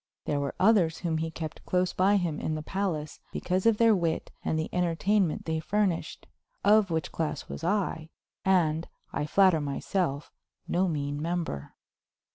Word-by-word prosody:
There 145 Hz, -, 0 dB
were 140 Hz, -1 st, -3 dB
others 185 Hz, -6 st, +4 dB
whom 165 Hz, -3 st, -1 dB
he 165 Hz, 0 st, -2 dB
kept 160 Hz, -1 st, -7 dB
close 180 Hz, 0 st, 0 dB
by 195 Hz, +2 st, +4 dB
him 170 Hz, -5 st, -1 dB
in 155 Hz, -, -2 dB
the 155 Hz, -, -4 dB
palace 165 Hz, -5 st, -3 dB
because 185 Hz, +4 st, 0 dB
of 225 Hz, -2 st, +4 dB
their 230 Hz, -1 st, +5 dB
wit 170 Hz, -3 st, -1 dB
and 160 Hz, -, 0 dB
the 160 Hz, -, -1 dB
entertainment 180 Hz, +1 st, +1 dB
they 160 Hz, -1 st, -1 dB
furnished; 195 Hz, 0 st, -1 dB, 0.4 s
of 210 Hz, -1 st, +5 dB
which 160 Hz, -1 st, -2 dB
class 160 Hz, -2 st, -3 dB
was -, -, -7 dB
I, 175 Hz, -4 st, -1 dB, 0.3 s
and, 165 Hz, -4 st, +2 dB, 0.3 s
I 150 Hz, -, -1 dB
flatter 185 Hz, -3 st, +4 dB
myself, 145 Hz, +1 st, -2 dB, 0.4 s
no 185 Hz, +2 st, +2 dB
mean 145 Hz, -3 st, -2 dB
member. 165 Hz, -, -3 dB
170 Hz, 160 wpm, -28 LUFS, 155-190 Hz, 0.4 s, their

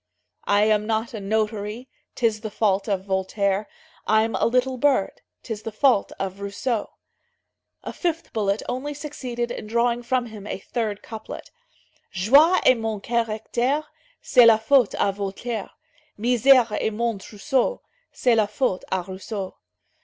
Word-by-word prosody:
"I 205 Hz, +1 st, +4 dB
am 210 Hz, 0 st, +2 dB
not 225 Hz, +1 st, -1 dB
a 220 Hz, -, -4 dB
notary, 215 Hz, +3 st, -2 dB, 0.3 s
'Tis 225 Hz, -3 st, 0 dB
the 220 Hz, -, -4 dB
fault 205 Hz, -1 st, 0 dB
of 190 Hz, -2 st, -1 dB
Voltaire; 195 Hz, +1 st, 0 dB, 0.4 s
I'm 220 Hz, +1 st, +3 dB
a -, -, +2 dB
little 255 Hz, +2 st, +1 dB
bird, 260 Hz, -6 st, +1 dB, 0.2 s
'Tis 220 Hz, -3 st, -5 dB
the 225 Hz, -, -5 dB
fault 240 Hz, -1 st, +2 dB
of 195 Hz, 0 st, -4 dB
Rousseau." 205 Hz, +3 st, -3 dB, 0.9 s
A -, -, -6 dB
fifth 335 Hz, -2 st, -3 dB
bullet 205 Hz, -1 st, 0 dB
only 275 Hz, +4 st, -3 dB
succeeded 250 Hz, -5 st, -4 dB
in 215 Hz, -, -6 dB
drawing 235 Hz, +2 st, +1 dB
from 245 Hz, +1 st, 0 dB
him 215 Hz, -3 st, -10 dB
a -, -, -3 dB
third 215 Hz, 0 st, -4 dB
couplet. 220 Hz, -1 st, -9 dB, 0.6 s
"Joie 280 Hz, -, +5 dB
est 255 Hz, -2 st, +5 dB
mon 220 Hz, -2 st, -2 dB
caractère, 235 Hz, +5 st, -1 dB, 0.4 s
C'est 245 Hz, -3 st, +6 dB
la 225 Hz, -1 st, +7 dB
faute 240 Hz, +1 st, +3 dB
à 200 Hz, -, +1 dB
Voltaire; 200 Hz, +3 st, -4 dB, 0.5 s
Misère 245 Hz, +1 st, +4 dB
est -, -, 0 dB
mon 230 Hz, -1 st, -1 dB
trousseau, 255 Hz, -, -1 dB, 0.3 s
C'est 245 Hz, -, +2 dB
la 215 Hz, -2 st, +3 dB
faute 210 Hz, -3 st, -1 dB
à 185 Hz, -2 st, -1 dB
Rousseau." 190 Hz, +1 st, -6 dB
220 Hz, 145 wpm, -24 LUFS, 205-245 Hz, 0.9 s, la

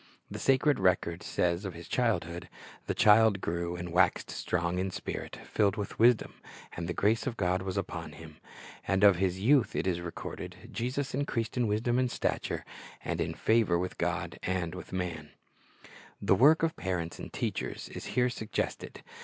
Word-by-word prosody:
The -, -, -5 dB
sacred 135 Hz, 0 st, +3 dB
record 90 Hz, -2 st, +1 dB
says 85 Hz, +1 st, 0 dB
of 95 Hz, -4 st, -5 dB
His 85 Hz, 0 st, -9 dB
childhood, 90 Hz, -8 st, -1 dB, 0.4 s
"The -, -, -1 dB
child 105 Hz, -1 st, +6 dB
grew, 85 Hz, 0 st, -2 dB
and 90 Hz, 0 st, -5 dB
waxed 90 Hz, -, +3 dB
strong 85 Hz, +1 st, -1 dB
in 95 Hz, +1 st, 0 dB
spirit, -, -, -5 dB
filled 105 Hz, 0 st, +1 dB
with 105 Hz, -2 st, -5 dB
wisdom; 120 Hz, 0 st, +4 dB, 0.4 s
and 85 Hz, +1 st, -4 dB
the -, -, 0 dB
grace 110 Hz, +5 st, +2 dB
of 120 Hz, -2 st, -3 dB
God 90 Hz, -1 st, +1 dB
was 95 Hz, 0 st, -3 dB
upon 85 Hz, -5 st, -4 dB
Him." 80 Hz, 0 st, -12 dB, 0.5 s
And 95 Hz, 0 st, +2 dB
of 100 Hz, -3 st, +7 dB
His 95 Hz, 0 st, 0 dB
youth 130 Hz, +3 st, +4 dB
it -, -, 0 dB
is 90 Hz, -2 st, 0 dB
recorded, 85 Hz, -1 st, -6 dB, 0.2 s
"Jesus 130 Hz, +3 st, -2 dB
increased 120 Hz, -4 st, -2 dB
in 125 Hz, -2 st, +1 dB
wisdom 115 Hz, +4 st, +1 dB
and 130 Hz, -1 st, +2 dB
stature, -, -, -2 dB, 0.4 s
and -, -, -1 dB
in -, -, -2 dB
favor 110 Hz, -6 st, +3 dB
with 90 Hz, +1 st, -4 dB
God -, -, -2 dB
and 90 Hz, -2 st, -1 dB, 0.2 s
man."' 85 Hz, -5 st, -3 dB, 0.9 s
The -, -, +3 dB
work 155 Hz, +5 st, +6 dB
of 165 Hz, 0 st, +1 dB
parents 85 Hz, -3 st, -3 dB
and -, -, -7 dB
teachers -, -, -3 dB
is -, -, -7 dB
here 125 Hz, 0 st, +4 dB
suggested. 110 Hz, -3 st, -4 dB
95 Hz, 170 wpm, -30 LUFS, 85-115 Hz, 0.9 s, of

